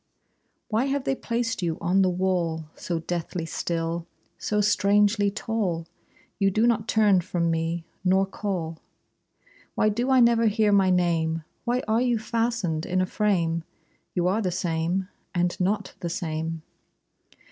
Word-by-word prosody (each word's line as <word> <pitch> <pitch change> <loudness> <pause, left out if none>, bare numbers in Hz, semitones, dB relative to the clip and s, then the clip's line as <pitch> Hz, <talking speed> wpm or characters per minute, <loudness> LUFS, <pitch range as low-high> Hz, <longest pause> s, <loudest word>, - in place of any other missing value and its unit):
Why 225 +3 +1
have 275 0 -1
they 270 - +1
placed 235 -4 -2
you 165 -2 -1
on 185 +3 +2
the 185 - +4
wall, 175 -3 0
So 175 - -3
deathly 170 0 -3
still, 165 +1 -2 0.3
so 210 - 0
strangely 205 0 +3
tall? 200 -5 -2 0.5
You 195 -1 +4
do 215 +4 +2
not 230 -2 +2
turn 210 -5 +4
from 170 -1 -1
me, 165 +1 -1 0.2
nor 190 +1 +3
call. 180 -5 -4 1.0
Why 215 - +3
do 240 +5 -1
I 260 -1 +5
never 235 -1 +5
hear 215 0 +3
my 195 -2 +4
name? 165 -3 +1 0.2
Why 245 +1 0
are 220 +2 +2
you 245 -2 +2
fastened 225 -7 -1
in 185 +1 0
a 185 - +2
frame? 175 -5 0 0.5
You 175 -1 +2
are 200 +5 +1
the 185 - 0
same, 175 +1 -1 0.3
and 175 0 +1
not 200 +2 0
the 170 - -3
same. 160 -1 -3
190 Hz, 150 wpm, -26 LUFS, 170-215 Hz, 1.0 s, I